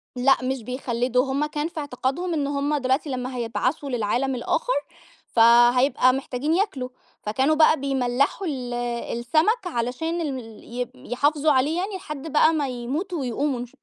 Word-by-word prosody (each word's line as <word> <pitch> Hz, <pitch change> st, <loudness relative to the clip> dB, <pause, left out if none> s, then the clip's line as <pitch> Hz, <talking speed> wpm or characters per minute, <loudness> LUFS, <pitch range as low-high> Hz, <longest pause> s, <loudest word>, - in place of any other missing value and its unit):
لأ، 265 Hz, +2 st, +4 dB
مش 260 Hz, -2 st, -2 dB
بيخلّدوا، 250 Hz, 0 st, 0 dB
هُم 285 Hz, +3 st, +1 dB
كان 300 Hz, +1 st, -2 dB
في 335 Hz, -2 st, -7 dB
اعتقادهم 285 Hz, +5 st, -2 dB
إن 285 Hz, -3 st, 0 dB
هُم 285 Hz, +1 st, 0 dB
دلوقتي 265 Hz, +3 st, 0 dB
لمّا 255 Hz, 0 st, -4 dB
هيبعثوا 255 Hz, +5 st, -2 dB
للعالم 245 Hz, +3 st, 0 dB
الآخر، -, -, 0 dB, 0.5 s
فهيبقى 240 Hz, +3 st, +5 dB
محتاجين 270 Hz, +3 st, -2 dB
ياكلوا، 335 Hz, -10 st, -1 dB, 0.3 s
فكانوا 265 Hz, +9 st, +1 dB
بقى 310 Hz, -1 st, +5 dB
بيملحوا 275 Hz, +6 st, 0 dB
ال 250 Hz, -4 st, -4 dB, 0.5 s
السمك 330 Hz, -, +1 dB
علشان 320 Hz, +6 st, -2 dB
ال 315 Hz, -, -1 dB
ال 225 Hz, -3 st, -12 dB
ي 245 Hz, +1 st, -5 dB, 0.2 s
يحافظوا 295 Hz, +4 st, +2 dB
عليه 285 Hz, +5 st, +2 dB
يعني 385 Hz, +2 st, -2 dB
لحد 300 Hz, -4 st, -7 dB
بقى 315 Hz, +2 st, +5 dB
ما 295 Hz, -3 st, 0 dB
يموتوا 290 Hz, +9 st, -3 dB
ويقوموا 260 Hz, +1 st, -1 dB
إن 245 Hz, -, -4 dB
شا 240 Hz, -, -21 dB
270 Hz, 155 wpm, -24 LUFS, 250-305 Hz, 0.5 s, فهيبقى